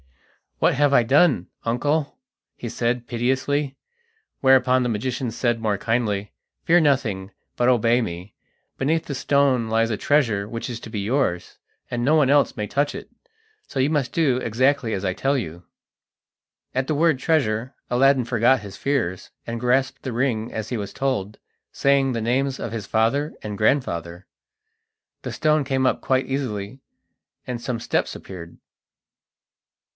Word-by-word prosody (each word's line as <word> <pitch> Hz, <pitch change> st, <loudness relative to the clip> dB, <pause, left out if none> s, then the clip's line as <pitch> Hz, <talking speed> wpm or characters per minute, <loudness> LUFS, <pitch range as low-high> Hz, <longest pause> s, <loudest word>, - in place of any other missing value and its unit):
"What -, -, +3 dB
have 145 Hz, 0 st, +3 dB
I 125 Hz, -, +6 dB
done, 135 Hz, -, +3 dB, 0.2 s
uncle?" 145 Hz, -, 0 dB, 0.4 s
he 120 Hz, -, -6 dB
said 120 Hz, +1 st, -1 dB
piteously; 135 Hz, +3 st, -1 dB, 0.6 s
whereupon 130 Hz, -1 st, +5 dB
the 125 Hz, -, 0 dB
magician 120 Hz, +3 st, -2 dB
said 120 Hz, 0 st, 0 dB
more 110 Hz, -2 st, 0 dB
kindly: 105 Hz, -2 st, -1 dB, 0.3 s
"Fear 175 Hz, +1 st, +5 dB
nothing, 110 Hz, -10 st, 0 dB, 0.2 s
but 120 Hz, -, +1 dB
obey 120 Hz, 0 st, +3 dB
me. 90 Hz, -1 st, -6 dB, 0.4 s
Beneath 160 Hz, +4 st, 0 dB
this 140 Hz, -2 st, -4 dB
stone 135 Hz, -6 st, +2 dB
lies 115 Hz, 0 st, +2 dB
a 110 Hz, -, -1 dB
treasure 115 Hz, -9 st, +1 dB
which 115 Hz, +3 st, -5 dB
is 120 Hz, -, -5 dB
to -, -, -9 dB
be 105 Hz, -, -3 dB
yours, 100 Hz, -5 st, -1 dB, 0.3 s
and 120 Hz, -1 st, -2 dB
no 145 Hz, +5 st, +3 dB
one 145 Hz, -4 st, +4 dB
else 145 Hz, -3 st, +3 dB
may 105 Hz, -, -2 dB
touch 145 Hz, +5 st, 0 dB
it, -, -, -8 dB, 0.6 s
so 135 Hz, -, -4 dB
you 130 Hz, +2 st, +3 dB
must 145 Hz, -5 st, 0 dB
do 145 Hz, -7 st, +2 dB
exactly 130 Hz, 0 st, +1 dB
as 95 Hz, 0 st, -3 dB
I 95 Hz, -, 0 dB
tell 135 Hz, +8 st, 0 dB
you." 85 Hz, -7 st, -6 dB, 1.1 s
At 130 Hz, 0 st, 0 dB
the 155 Hz, -, 0 dB
word 160 Hz, -1 st, +3 dB
treasure, 130 Hz, -6 st, 0 dB, 0.2 s
Aladdin 130 Hz, 0 st, +4 dB
forgot 120 Hz, +1 st, +3 dB
his 100 Hz, -2 st, -9 dB
fears, 120 Hz, -11 st, -1 dB, 0.2 s
and 115 Hz, 0 st, -3 dB
grasped 125 Hz, +2 st, +1 dB
the 130 Hz, -, -4 dB
ring 115 Hz, -2 st, -1 dB
as 110 Hz, -1 st, -5 dB
he 125 Hz, -, -2 dB
was 100 Hz, -2 st, -5 dB
told, 105 Hz, -7 st, -2 dB, 0.3 s
saying 140 Hz, -1 st, +2 dB
the 115 Hz, -2 st, -2 dB
names 130 Hz, +4 st, 0 dB
of -, -, -4 dB
his 110 Hz, -3 st, -5 dB
father 130 Hz, +8 st, +1 dB
and 105 Hz, -1 st, -5 dB
grandfather. 90 Hz, -, 0 dB, 1.0 s
The -, -, -4 dB
stone 155 Hz, -1 st, +2 dB
came 135 Hz, -1 st, 0 dB
up -, -, 0 dB
quite 130 Hz, 0 st, +1 dB
easily 125 Hz, -4 st, -4 dB, 0.7 s
and 125 Hz, -2 st, -4 dB
some 120 Hz, -1 st, -3 dB
steps -, -, -1 dB
appeared. 85 Hz, -3 st, -10 dB
125 Hz, 160 wpm, -23 LUFS, 110-135 Hz, 1.1 s, I